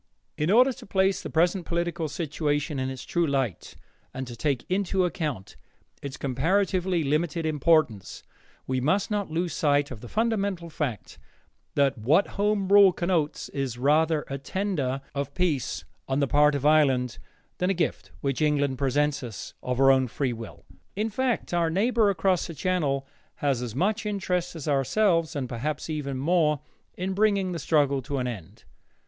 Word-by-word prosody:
In 150 Hz, +3 st, -1 dB
order 250 Hz, +6 st, +5 dB
to -, -, -13 dB
place 190 Hz, 0 st, +2 dB
the -, -, -6 dB
present 175 Hz, +3 st, +2 dB
political 170 Hz, -1 st, -2 dB
situation 145 Hz, -2 st, -2 dB
in 130 Hz, 0 st, -1 dB
its 130 Hz, -1 st, -6 dB
true 170 Hz, -2 st, 0 dB
light 135 Hz, -, -2 dB, 0.4 s
and 130 Hz, 0 st, -3 dB
to 120 Hz, -1 st, -8 dB
take 135 Hz, +1 st, -1 dB
into 190 Hz, 0 st, +1 dB
account 150 Hz, -, -4 dB, 0.5 s
its 140 Hz, -2 st, -6 dB
comparatively 180 Hz, +6 st, +1 dB
limited 155 Hz, +3 st, 0 dB
importance, 155 Hz, -, +1 dB, 0.4 s
we 130 Hz, -1 st, -1 dB
must 190 Hz, -, +1 dB
not 205 Hz, -3 st, -1 dB
lose 170 Hz, +2 st, -2 dB
sight 145 Hz, -2 st, +1 dB
of 115 Hz, -5 st, -8 dB
the 120 Hz, -, -9 dB
fundamental 200 Hz, -, -1 dB
fact 140 Hz, -9 st, -4 dB, 0.6 s
that 140 Hz, -4 st, +2 dB
what 150 Hz, -, +3 dB
Home 205 Hz, -1 st, 0 dB
Rule 200 Hz, -1 st, +8 dB
connotes 170 Hz, -4 st, -1 dB
is 135 Hz, -4 st, -3 dB
rather 150 Hz, +4 st, +2 dB
a 135 Hz, 0 st, -4 dB
tender 140 Hz, -6 st, -2 dB
of 140 Hz, 0 st, -4 dB
peace 165 Hz, -8 st, -1 dB, 0.2 s
on 135 Hz, +1 st, 0 dB
the 140 Hz, -, +3 dB
part 150 Hz, +2 st, +4 dB
of 140 Hz, 0 st, -3 dB
Ireland 135 Hz, -5 st, +3 dB, 0.4 s
than 180 Hz, -, +1 dB
a 195 Hz, -, +1 dB
gift 165 Hz, -2 st, -2 dB
which 140 Hz, +1 st, -1 dB
England 145 Hz, -3 st, +1 dB
presents 145 Hz, +2 st, +1 dB
us 115 Hz, -9 st, -7 dB
of 125 Hz, -1 st, -2 dB
her 135 Hz, 0 st, +6 dB
own 130 Hz, -1 st, +3 dB
free 125 Hz, +1 st, -2 dB
will. 115 Hz, -2 st, -10 dB, 0.3 s
In 215 Hz, +3 st, -1 dB
fact, 250 Hz, -3 st, -1 dB
our 170 Hz, -1 st, +2 dB
neighbor 215 Hz, +4 st, +2 dB
across 185 Hz, -1 st, +1 dB
the 165 Hz, -, -8 dB
Channel 145 Hz, -6 st, 0 dB, 0.3 s
has 140 Hz, -4 st, 0 dB
as 120 Hz, -2 st, -5 dB
much 210 Hz, -, 0 dB
interest 180 Hz, -4 st, -2 dB
as 160 Hz, -3 st, -7 dB
ourselves, 165 Hz, -, +2 dB
and 135 Hz, -3 st, -2 dB
perhaps 145 Hz, +7 st, -3 dB
even 140 Hz, -3 st, -3 dB
more, 150 Hz, 0 st, +2 dB, 0.4 s
in 185 Hz, +1 st, -2 dB
bringing 200 Hz, -2 st, +2 dB
the 170 Hz, -, -3 dB
struggle 140 Hz, -3 st, +2 dB
to 140 Hz, +3 st, -4 dB
an 130 Hz, -, -1 dB
end. 105 Hz, -10 st, -7 dB
155 Hz, 170 wpm, -26 LUFS, 135-185 Hz, 0.6 s, Rule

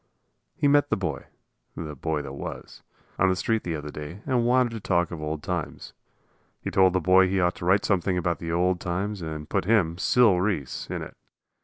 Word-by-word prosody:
He 145 Hz, -, +1 dB
met 145 Hz, 0 st, +4 dB
the -, -, +1 dB
boy 80 Hz, -8 st, -3 dB, 0.5 s
the 75 Hz, -2 st, -6 dB
boy 75 Hz, +2 st, -2 dB
that 70 Hz, -1 st, -7 dB
was 70 Hz, -, -8 dB, 0.4 s
on 95 Hz, -, +4 dB
the 95 Hz, -, +2 dB
street 110 Hz, +4 st, 0 dB
the 85 Hz, -2 st, -3 dB
other 75 Hz, -1 st, -6 dB
day 75 Hz, +8 st, -8 dB
and 125 Hz, -4 st, +1 dB
wanted 125 Hz, -1 st, +3 dB
to 115 Hz, -, -5 dB
talk 90 Hz, -5 st, 0 dB
of 85 Hz, -3 st, -6 dB
old 75 Hz, -1 st, -4 dB
times. -, -, -4 dB, 0.7 s
He -, -, -5 dB
told 95 Hz, -2 st, +4 dB
the 95 Hz, -, +2 dB
boy 95 Hz, +2 st, +5 dB
he 95 Hz, +1 st, 0 dB
ought 90 Hz, 0 st, +2 dB
to -, -, -6 dB
write 95 Hz, +3 st, +3 dB
something 95 Hz, -1 st, +1 dB
about 85 Hz, -1 st, -1 dB
the 85 Hz, -1 st, -4 dB
old 90 Hz, +1 st, +1 dB
times 95 Hz, +3 st, -3 dB
and 80 Hz, -2 st, -5 dB
put 80 Hz, -, -1 dB
him, 90 Hz, -6 st, +2 dB
Sil 110 Hz, -5 st, +4 dB
Reese, 90 Hz, -10 st, -2 dB
in -, -, -3 dB
it. -, -, -10 dB
90 Hz, 210 wpm, -26 LUFS, 80-100 Hz, 0.7 s, boy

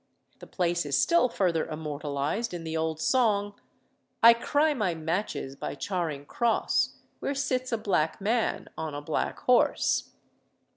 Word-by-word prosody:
The -, -, -11 dB
place 175 Hz, -1 st, 0 dB
is 145 Hz, -1 st, 0 dB
still 335 Hz, -, +4 dB
further 175 Hz, -7 st, 0 dB
immortalised 150 Hz, +6 st, -3 dB
in 170 Hz, -, -6 dB
the 160 Hz, 0 st, -4 dB
old 160 Hz, -1 st, -1 dB
song 205 Hz, -3 st, +2 dB, 0.7 s
"I 230 Hz, 0 st, +10 dB
cry 290 Hz, +6 st, +1 dB
my 205 Hz, -10 st, -1 dB
matches 160 Hz, -3 st, -3 dB
by 140 Hz, -, -5 dB
Charing 155 Hz, -3 st, -3 dB
Cross, 235 Hz, +7 st, +1 dB, 0.2 s
Where 280 Hz, -, -2 dB
sits 255 Hz, -2 st, -1 dB
a 230 Hz, -, +1 dB
black 180 Hz, -7 st, 0 dB
man 220 Hz, +3 st, 0 dB
on 155 Hz, -2 st, -4 dB
a 145 Hz, -, -4 dB
black 155 Hz, -, -2 dB
horse." 250 Hz, -1 st, +2 dB
180 Hz, 145 wpm, -28 LUFS, 155-235 Hz, 0.7 s, I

